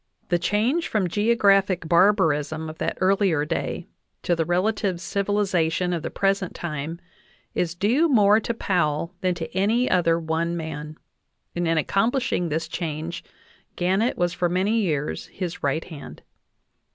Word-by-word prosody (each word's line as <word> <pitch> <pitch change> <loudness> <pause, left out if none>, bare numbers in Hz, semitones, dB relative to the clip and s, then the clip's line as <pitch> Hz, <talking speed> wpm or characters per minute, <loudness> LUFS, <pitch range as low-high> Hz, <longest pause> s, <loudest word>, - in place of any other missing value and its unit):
The 175 - +2
change 220 - +1
from 205 -4 0
geographic 195 -3 +2
barbarism 160 -4 +2
of 155 - -16
that - - -2
earlier 185 -5 +2
day 165 +1 -3 0.4
to 175 - +1
the 165 -1 0
relative 185 +1 0
civili 200 +3 0
zation 180 -1 0
of 165 - -3
the - - -4
present 195 -2 0
time 160 0 -5 0.5
is 170 -1 -1
due 240 - +2
more 210 -5 +5
to 235 - -3
Powell 170 -5 0
than 185 -2 +1
to 170 +1 -7
any 220 +6 +2
other 170 -2 +3
one 165 +1 -1
man, 155 -1 -6 0.6
and 175 -1 0
in 165 0 +2
accomplishing 200 - +1
this 160 +2 -2
change 160 0 -4 0.5
Gannett 190 +7 +1
was 175 0 0
for 180 -1 0
many 195 +6 +1
years 155 -8 -2
his 180 -2 -5
right 145 +3 0
hand. 155 -5 -10
175 Hz, 150 wpm, -24 LUFS, 165-200 Hz, 0.6 s, more